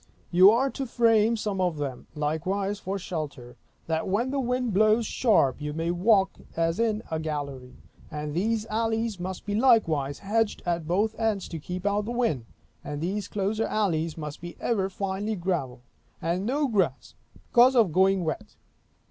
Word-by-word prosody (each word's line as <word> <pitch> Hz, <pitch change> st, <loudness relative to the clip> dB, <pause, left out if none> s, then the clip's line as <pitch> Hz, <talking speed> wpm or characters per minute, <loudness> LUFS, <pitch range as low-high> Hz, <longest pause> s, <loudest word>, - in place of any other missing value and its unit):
You 185 Hz, +3 st, +8 dB
are 255 Hz, +5 st, +2 dB
to 270 Hz, -, -4 dB
frame 230 Hz, -1 st, +3 dB
some 205 Hz, -3 st, -2 dB
of 175 Hz, -4 st, 0 dB
them, 135 Hz, -4 st, -5 dB
likewise, 185 Hz, +7 st, -1 dB
for 195 Hz, 0 st, -3 dB
shelter, 145 Hz, -9 st, -6 dB, 0.3 s
that 160 Hz, 0 st, -1 dB
when 225 Hz, +7 st, 0 dB
the 280 Hz, -, -1 dB
wind 250 Hz, -3 st, -1 dB
blows 215 Hz, +3 st, +4 dB
sharp 190 Hz, -, +2 dB
you 150 Hz, 0 st, -3 dB
may 165 Hz, +2 st, -1 dB
walk 195 Hz, +2 st, +2 dB, 0.2 s
as 165 Hz, +3 st, +1 dB
in 225 Hz, -1 st, +1 dB
a 160 Hz, -, -1 dB
gallery. 140 Hz, -5 st, -5 dB, 0.3 s
And 150 Hz, 0 st, -5 dB
those 215 Hz, +4 st, 0 dB
alleys 225 Hz, -1 st, -1 dB
must 185 Hz, +1 st, -5 dB
be 205 Hz, -, -2 dB
likewise 165 Hz, -, +3 dB
hedged 215 Hz, +2 st, -1 dB
at 170 Hz, -3 st, -1 dB
both 205 Hz, +6 st, +1 dB
ends, 220 Hz, -4 st, 0 dB
to 165 Hz, -, -5 dB
keep 180 Hz, +4 st, -6 dB
out 205 Hz, 0 st, +1 dB
the 235 Hz, -, -4 dB
wind; 230 Hz, -, 0 dB, 0.4 s
and 145 Hz, 0 st, -5 dB
these 195 Hz, +6 st, -2 dB
closer 210 Hz, +2 st, -1 dB
alleys 170 Hz, -7 st, 0 dB
must 150 Hz, -2 st, -6 dB
be 175 Hz, 0 st, -8 dB
ever 195 Hz, -5 st, 0 dB
finely 195 Hz, +2 st, -3 dB
gravelled, 170 Hz, -10 st, -2 dB, 0.4 s
and 175 Hz, +5 st, -1 dB
no 285 Hz, +3 st, +1 dB
grass, 190 Hz, -, 0 dB, 0.4 s
because 250 Hz, +2 st, +6 dB
of 225 Hz, -8 st, +4 dB
going 190 Hz, +2 st, +3 dB
wet. 210 Hz, +7 st, -4 dB
195 Hz, 170 wpm, -27 LUFS, 160-220 Hz, 0.4 s, You